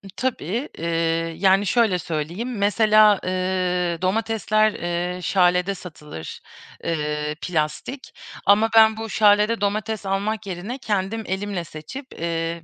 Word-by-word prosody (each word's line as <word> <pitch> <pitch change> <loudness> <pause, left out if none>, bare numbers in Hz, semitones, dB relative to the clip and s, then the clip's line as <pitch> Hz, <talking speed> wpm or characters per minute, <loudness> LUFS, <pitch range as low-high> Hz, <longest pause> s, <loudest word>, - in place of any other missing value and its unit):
Tabii. 240 - -2
Eee, 165 - -5 0.5
yani, 195 +2 +4
şöyle 215 -4 +2
söyleyeyim, 170 +10 -4
mesela, 210 0 +5
eee, 185 -1 0
domatesler, 215 +2 +1
eee, 175 +1 -3
Schale 180 +2 +2
satılır, 150 - -9 0.4
eee, 150 -2 -2
plastik 180 - -3 0.3
ama 215 +3 +5
ben 220 -1 +6
bu 225 0 -5
Schale 210 +1 +3
domates 210 +1 -1
almak 205 +3 -1
yerine 195 +7 -5
kendim 215 -2 -2
elimle 190 -1 -3
seçip 160 - -9 0.2
eee 165 0 -2
195 Hz, 115 wpm, -23 LUFS, 175-215 Hz, 0.5 s, ben